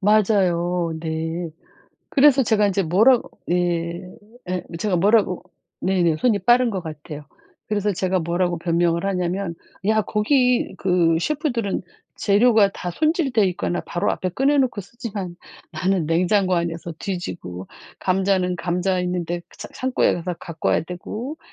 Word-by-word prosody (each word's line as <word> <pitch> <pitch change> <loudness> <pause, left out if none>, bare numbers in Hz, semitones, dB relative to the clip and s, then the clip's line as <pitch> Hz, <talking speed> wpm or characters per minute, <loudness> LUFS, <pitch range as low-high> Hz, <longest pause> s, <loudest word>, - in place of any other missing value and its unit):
맞아요. 180 -5 +2
네. 160 +1 -3 0.6
그래서 275 -1 +5
제가 215 -3 +3
이제 195 0 +1
뭐라고 220 +9 +4 0.2
네 175 0 -1 0.5
예 185 0 -1
뭐 165 - -7
제가 190 -1 0
뭐라고 200 0 +3 0.4
네네 175 -4 +2
손이 220 -2 +2
빠른 245 0 +4
것 195 -4 -3
같아요. 150 -1 -8 0.4
그래서 210 -1 0
제가 185 0 0
뭐라고 175 +1 0
변명을 170 +1 +1
하냐면 180 -1 -1 0.3
야 215 0 +3
거기 250 +4 +1
그 175 -3 +2
셰프들은 240 - -1 0.3
재료가 210 0 +4
다 180 - -5
손질돼 300 - +2
있거나 175 -1 -2
바로 175 - -1
앞에 185 - -2
꺼내 275 +9 +2
놓고 255 -6 +1
쓰지만 200 -3 -6 0.4
나는 185 -3 0
냉장고 185 +3 +2
안에서 170 0 -2
뒤지고 95 - -5 0.3
감자는 185 -1 +1
감자 180 +2 0
있는데 175 -1 -2
그 - - -20
차 - - -6
창고에 260 0 +1
가서 175 +1 -4
갖고 165 -2 -4
와야 - - +2
되고 215 - -6
185 Hz, 300 characters per minute, -22 LUFS, 170-215 Hz, 0.6 s, 그래서